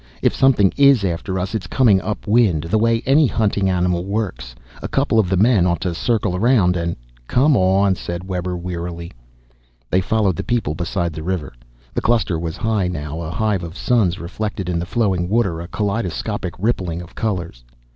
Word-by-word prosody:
If - - +3
something 120 -8 +4
is 140 -6 +5
after 95 +2 -2
us 95 +3 -3
it's 110 -4 -3
coming 110 -8 +3
up 105 - -4
wind, 105 -8 +3
the 105 +6 0
way 115 +1 +2
any 140 +3 +4
hunting 100 -4 0
animal 90 -1 0
works. 95 - -4 0.3
A - - -3
couple 135 -5 +1
of 100 -5 +2
the 95 - +1
men 105 -3 +4
ought 85 -1 0
to 90 -2 -1
circle 105 0 0
around 100 -3 +3
and 85 -1 -2 0.2
" - - -30
"Come 140 +3 +3
on," 95 0 +3
said 85 0 -6
Webber 90 -1 -3
wearily. 85 -1 -5 0.8
They 95 - +3
followed 100 -3 +1
the - - -3
people 115 -11 -1
beside 85 +1 -2
the 80 - -6
river. 85 -5 -3 0.4
The - - -1
cluster 110 -8 +1
was 80 -1 -4
high 110 -4 0
now, 80 -2 -5
a 80 - -5
hive 100 +1 0
of 85 +1 -8
suns 105 -8 +1
reflected 95 +1 -4
in 85 -1 -1
the 85 - -4
flowing 95 -6 0
water, 95 -7 +1
a 85 - -7
kaleidoscopic 105 -2 -3
rippling 90 -5 -1
of 85 - -15
colors. 90 - -3
95 Hz, 190 wpm, -20 LUFS, 85-110 Hz, 0.8 s, is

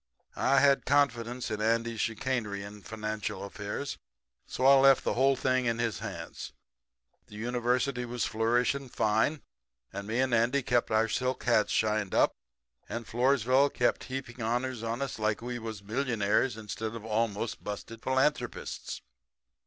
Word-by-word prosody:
"I 135 0 +3
had 140 0 +4
confidence 125 -4 +1
in 105 -1 -2
Andy's 115 +1 0
chicanery 110 -3 -2
in 105 +1 -10
financial 110 -1 -4
affairs, 105 +7 -5 0.5
so 130 - -2
I 135 - +9
left 135 -1 +6
the - - 0
whole 135 +2 +3
thing 130 0 +1
in 115 -1 +1
his 115 -5 -1
hands. - - -7 0.7
The 105 - -13
University 125 +3 0
was 120 0 -2
flourishing 120 +4 +1
fine, 110 +8 +1 0.5
and 100 +1 -5
me 115 +3 -1
and 130 -1 +1
Andy 120 +4 +2
kept 120 -1 +1
our 110 +1 +3
silk 125 +3 -1
hats 115 -3 +3
shined 105 -2 +1
up, - - +5 0.6
and 115 0 -4
Floresville 130 +3 +3
kept 120 - 0
on - - -13
heaping 130 -2 -6
honors 120 +2 -1
on 115 +3 -2
us 135 - -5
like 110 0 0
we 120 0 -4
was 110 -3 -6
millionaires 110 0 0
instead 110 +1 -5
of 110 -2 -8
almost 110 0 -1
busted 105 +2 -6
philanthropists. 130 -1 -1
115 Hz, 155 wpm, -30 LUFS, 110-130 Hz, 0.7 s, I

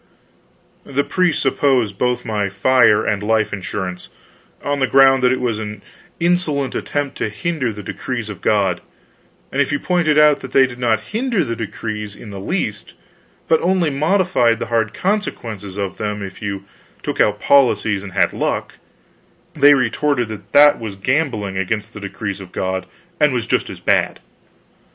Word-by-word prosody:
The 140 +1 -1
priests 180 -4 0
opposed 130 -7 +1
both 125 0 0
my 105 -2 -1
fire 105 +2 +4
and 105 -1 0
life 110 0 +1
insurance, 95 -1 -5 0.5
on 145 0 -1
the 135 - +2
ground 135 0 +5
that 125 0 +4
it 130 - 0
was 120 -4 -1
an 105 -2 -7 0.4
insolent 165 -6 +1
attempt 145 -2 -3
to - - -1
hinder 130 +2 -2
the 105 -1 -8
decrees 120 +2 -4
of 105 -5 -8
God; 100 -4 +1 0.7
and 140 - +1
if 140 - 0
you 145 - +1
pointed 170 -4 +1
out 150 -1 +6
that 130 - -9
they 135 - +6
did 125 -1 -8
not 115 -3 +1
hinder 225 -3 0
the 115 -5 -3
decrees 105 -2 -5
in 105 - -11
the 100 - -7
least, 105 - -3 0.5
but 160 - +3
only 175 -3 +1
modified 155 -5 +2
the - - -4
hard 115 -2 +1
consequences 115 - -3
of 100 -2 -3
them 105 -1 -3
if 95 -1 -9
you 100 -2 -4 0.4
took - - -1
out 105 0 +2
policies 120 -7 +3
and 95 -2 -9
had 100 - +2
luck, - - -2 0.8
they 145 -2 +6
retorted 130 0 0
that 100 -2 -9
that 145 0 +6
was 110 -4 -6
gambling 110 -4 -1
against 105 +4 -3
the - - -8
decrees 100 0 -5
of 90 -1 -11
God, 95 0 -3 0.3
and 150 -2 +4
was 120 -2 -1
just - - 0
as - - -8
bad. - - +1
115 Hz, 170 wpm, -19 LUFS, 105-145 Hz, 0.8 s, out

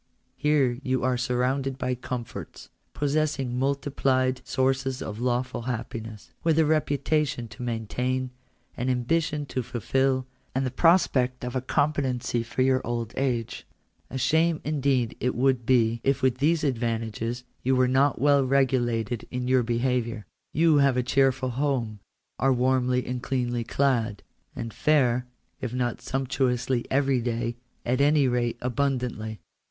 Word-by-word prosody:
Here 150 -3 +3
are 120 - -6
you 130 -2 0
surrounded 130 +2 0
by 125 -1 -1
comforts, 125 -1 -6 0.3
possessing 145 -4 0
multiplied 135 -2 +1
sources 130 +1 0
of 105 0 -6
lawful 125 0 -1
happiness, 115 -3 -6
with 160 -2 +2
a 160 - +5
reputation 150 -4 0
to - - -11
maintain, 125 +2 -2 0.4
an 125 +2 -2
ambition 150 +4 0
to 130 - -3
fulfil, 130 +2 0 0.3
and 135 +1 +1
the 130 - -2
prospect 135 -8 +3
of 125 +1 -5
a 130 - 0
compe 145 +3 +1
tency 125 -3 -1
for 125 +3 -1
your 130 0 +3
old 120 -1 -3
age. 125 -4 -2 0.4
A 130 - -4
shame 160 +4 +2
indeed 135 -5 0
would 125 +2 +2
it 120 - -21
be 115 -2 +3
if 135 -1 +1
with 130 -1 +2
these 155 +3 +2
advantages 115 -2 -2 0.2
you 130 +1 +2
were 130 0 +4
not 130 +1 +2
well 140 +1 +4
regulated 125 -4 +1
in 125 0 -3
your 130 0 +4
beha 120 +2 +1
viour. 115 -2 -6 0.3
You 160 0 +4
have 140 -3 +4
a 125 - +2
cheerful 130 0 +2
home, 125 -5 -1 0.4
are 135 +2 +3
warmly 125 0 +2
and 125 0 -3
cleanly 125 -3 -1
clad, 115 -5 0 0.3
and 115 -1 -5
fare, 125 -5 +2 0.3
if 125 -1 -4
not 120 -2 -1
sumptuously 130 -2 -1
every 135 -2 +2
day, 115 0 -2 0.3
at 125 +3 +1
any 145 -1 +4
rate 120 -1 0
abund 130 +1 0
antly. 110 -3 -5
130 Hz, 145 wpm, -26 LUFS, 120-135 Hz, 0.4 s, a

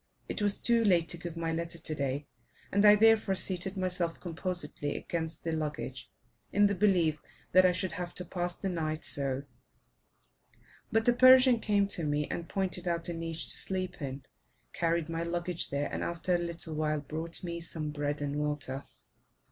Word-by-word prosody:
It - - -3
was 205 -1 +3
too 235 -1 +3
late 175 -5 +3
to 175 - +6
give 170 -1 -7
my 165 -1 -2
letter 170 +1 -3
today, 145 -3 -2 0.5
and 200 +1 +2
I 210 0 +9
therefore 220 -2 +4
seated 190 +1 +2
myself 180 -2 -1
composedly 170 -4 -2
against 165 -1 -4
the 165 - -2
luggage, 155 -2 -4 0.4
in 205 +1 +4
the 200 - +2
belief 180 -6 +2 0.3
that 185 +1 +6
I - - +3
should 185 +1 -1
have 180 -3 -6
to 180 - -3
pass 175 0 -3
the 195 - -5
night 160 -3 -3
so; 135 -1 +3 1.5
but 225 0 +1
a 245 - +6
Persian 255 -1 +7
came 205 -2 +1
to 170 - +3
me 150 0 -1
and 170 - -5
pointed 185 -2 0
out 170 0 -1
a - - -3
niche 165 -1 -3
to - - +1
sleep 185 -2 -2
in, 135 -1 -5 0.5
carried 165 -1 0
my 165 0 -3
luggage 170 0 -1
there, 140 +1 -2
and, - - -3
after 170 +1 0
a 175 - +2
little 170 -1 -2
while, 155 -1 -1
brought 160 +5 -3
me 170 -1 -5
some 160 -2 -3
bread 145 0 -3
and 145 0 -3
water. 145 -2 -3
170 Hz, 180 wpm, -30 LUFS, 155-185 Hz, 1.5 s, I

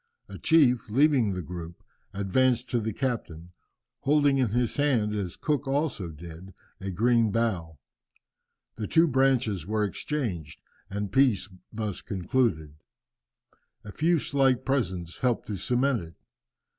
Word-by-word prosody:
A - - -9
chief, 125 -9 +3
leaving 130 -3 +3
the 90 -1 -4
group, 85 0 -8 0.3
advanced 120 +5 +1
to 120 - +2
the 110 0 -2
captain, 100 -9 -4 0.5
holding 145 -1 +3
in 125 -4 +2
his 120 +2 0
hand, 125 -8 +2
as 100 -4 -3
Cook 145 -2 -1
also 135 - -1
did, 85 +4 -11 0.2
a 95 - -5
green 115 +4 +2
bough. 95 -9 -1 1.0
The 105 - -3
two 165 +1 +4
branches 130 - +1
were 105 0 0
exchanged, 100 - -3 0.3
and 100 0 -4
peace 125 -5 +3 0.2
thus 105 -3 -4
concluded, 95 - -1 1.1
a 105 - -9
few 165 +9 +2
slight 135 -3 +1
presents 95 -11 -2
helped 125 -2 0
to 105 - -3
cement 125 +3 +1
it. 80 -1 -11
115 Hz, 130 wpm, -27 LUFS, 95-130 Hz, 1.1 s, two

